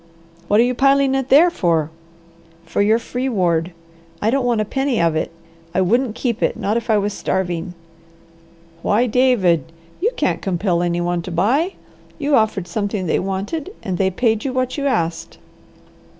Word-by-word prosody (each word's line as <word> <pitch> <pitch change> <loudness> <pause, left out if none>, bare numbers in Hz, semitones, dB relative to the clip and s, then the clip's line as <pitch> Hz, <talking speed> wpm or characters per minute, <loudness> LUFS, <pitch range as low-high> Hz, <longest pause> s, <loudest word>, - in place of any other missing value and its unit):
"What 205 +4 +3
are - - +7
you 250 +1 +1
piling 275 +1 +3
it 270 -1 -1
there 320 +6 +6
for?" 165 - 0 0.7
"For 185 - -1
your 215 +2 +4
free 250 +3 -3
ward. 175 -6 0 0.5
I 220 - +1
don't 265 -1 +1
want 235 -2 +1
a 215 - 0
penny 270 +1 -1
of 165 -1 +2
it. 160 - -1 0.5
I 190 - +3
wouldn't 230 +5 +1
keep 240 -2 -2
it, - - 0
not 205 +2 -1
if 235 0 -3
I 215 - +4
was 205 0 -1
starving." 175 -2 -2 1.1
"Why 215 +7 +2
David! 210 - +2 0.3
You 435 - +3
couldn't - - 0
compel 180 -2 0
any 175 0 0
one 175 0 -1
to 180 - -7
buy. 250 - +1 0.4
You 290 -2 +1
offered 215 -6 +1
something 200 +1 -2
they 160 - +1
wanted, 205 - -4
and 185 -3 -3
they 190 -1 +3
paid 220 +3 0
you 270 - -2
what 255 0 -1
you 280 -1 -1
asked." 170 - -2
210 Hz, 180 wpm, -20 LUFS, 175-255 Hz, 1.1 s, are